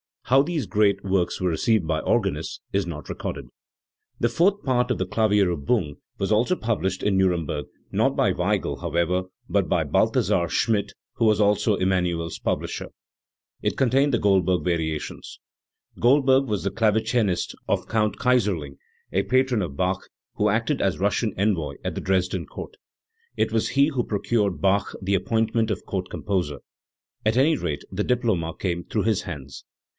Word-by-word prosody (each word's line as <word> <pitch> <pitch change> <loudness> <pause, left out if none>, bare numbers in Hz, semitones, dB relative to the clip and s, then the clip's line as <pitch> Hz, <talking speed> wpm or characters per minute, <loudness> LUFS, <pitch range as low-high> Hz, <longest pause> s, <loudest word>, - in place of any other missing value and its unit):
How 135 +2 +5
these 160 0 -2
great 100 -2 +2
works 95 -2 0
were 90 - +2
received 110 +3 +1
by 80 -1 0
organists - - -1
is 100 -2 0
not 75 -3 -6
recorded. - - -5 0.7
The 120 - +2
fourth 190 - +2
part 125 -2 +1
of 125 - 0
the 95 - -1
Klavierilbung 95 - +1 0.2
was 100 +1 -2
also 115 +12 +3
published 100 - -2
in 100 -2 +2
Nuremberg, 85 -6 0 0.3
not - - +2
by - - +3
Weigel, - - -1
however, 85 +2 0 0.3
but - - +1
by - - +1
Balthasar 85 - +2
Schmidt, 100 +3 0 0.2
who 115 - +1
was 110 -1 +4
also 105 +1 +3
Emmanuel's 90 -3 -1
publisher. - - -2 0.7
It - - -1
con 135 -3 +3
tained 135 +3 +3
the 120 - +1
Goldberg 95 -3 +2
Variations. 80 -3 -3 0.6
Goldberg 135 +1 +4
was 105 -6 -2
the 100 - -1
clave 110 -1 +2
cinist 110 -6 0
of - - -1
Count 105 -2 +1
Kayserling, 100 - +1 0.3
a 95 +4 +1
patron 130 -2 +2
of 80 -7 -4
Bach, 90 +3 -1 0.3
who - - +2
acted - - 0
as - - +1
Russian - - 0
envoy 90 -8 0
at - - -2
the - - -4
Dresden 95 -1 0
Court. - - -8 0.6
It - - 0
was 110 -1 +1
he 140 +2 +3
who 130 -5 -1
procured 100 -6 -1
Bach 100 +1 +1
the 95 +1 -1
appointment 110 +3 +1
of - - -3
Court 95 -2 -3
Composer; 90 -8 -2 0.7
at 110 +1 +2
any 150 +4 +4
rate 75 -4 -3
the 100 +2 -1
diploma 110 -10 0
came 85 -2 -2
through 105 - -1
his 110 -1 +1
hands. 70 -8 -8
100 Hz, 165 wpm, -24 LUFS, 90-115 Hz, 0.7 s, How